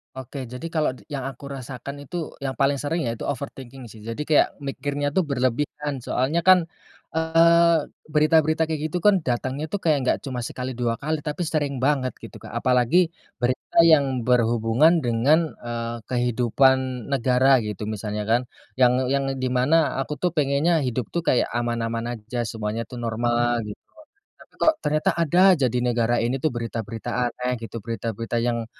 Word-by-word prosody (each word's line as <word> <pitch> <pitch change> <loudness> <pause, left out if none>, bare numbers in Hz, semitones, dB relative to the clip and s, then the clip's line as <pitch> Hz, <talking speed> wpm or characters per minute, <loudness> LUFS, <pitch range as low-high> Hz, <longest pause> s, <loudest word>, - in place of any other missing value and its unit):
Oke, 130 0 -7
jadi 125 +4 -9
kalau 155 -5 0
d - - -17
yang 135 -2 -3
aku 135 0 -9
rasakan 135 +1 -7
itu, 170 0 -4
yang 135 -1 -3
paling 140 0 +1
sering 160 +3 -1
yaitu 115 -1 -3
overthinking 135 -2 -6
sih. 110 - -13
Jadi 115 +6 -5
kayak 150 0 +4 0.2
mikirnya 145 +1 -2
tuh 175 +1 +1
berlebihan, 140 +2 -1
soalnya 130 +6 0
kan, 185 0 +6 0.5
eee, 165 +1 +4 0.3
berita-berita 155 +1 +3
kayak 160 -1 -2
gitu 175 +2 -4
kan, 205 -3 +5
datangnya 130 +5 -2
tuh 200 +5 -4
kayak 155 -3 +3
nggak - - +3
cuma 130 -3 -4
sekali, 125 +2 -4
2 120 -2 -1
kali, 155 +5 -2
tapi 150 +3 -3
sering 145 -5 -2
banget 135 -3 +1
gitu, - - -10
Kak, - - -11
apalagi 130 +8 +3 0.2
berita 125 +1 -2
yang 140 -6 +4
berhubungan 120 +7 +3
dengan, 140 +8 +2
eee, 120 0 -4
kehidupan 125 +1 +1
negara 130 0 +4
gitu, 105 -3 -5
misalnya 105 0 -4
kan. 115 +3 +2 0.4
Yang 125 -1 +5 0.2
yang 140 0 +1
di 130 -1 -2
mana 140 +4 +2
aku 140 +2 -3
tuh 180 +3 -1
pengennya 155 +2 +2
hidup 125 -4 -3
tuh 170 -1 -3
kayak 125 - +2
aman-aman 115 0 -2
aja, 115 +1 -4
semuanya 110 +1 -4
tuh 125 - -10
normal 120 +1 +1
gitu, 105 - -6 0.7
tapi - - -19
kok 320 - +5
ternyata 155 +1 +1
ada 170 +2 +2
aja 145 -7 +1
di 125 +1 -1
negara 120 0 +1
ini 125 +3 -1
tuh 155 - +2
berita-berita 115 -3 -5 0.2
aneh 125 +1 -3
gitu, 115 0 -6
berita-berita 115 0 -3
yang 120 -1 -1
130 Hz, 165 wpm, -24 LUFS, 120-150 Hz, 0.7 s, kan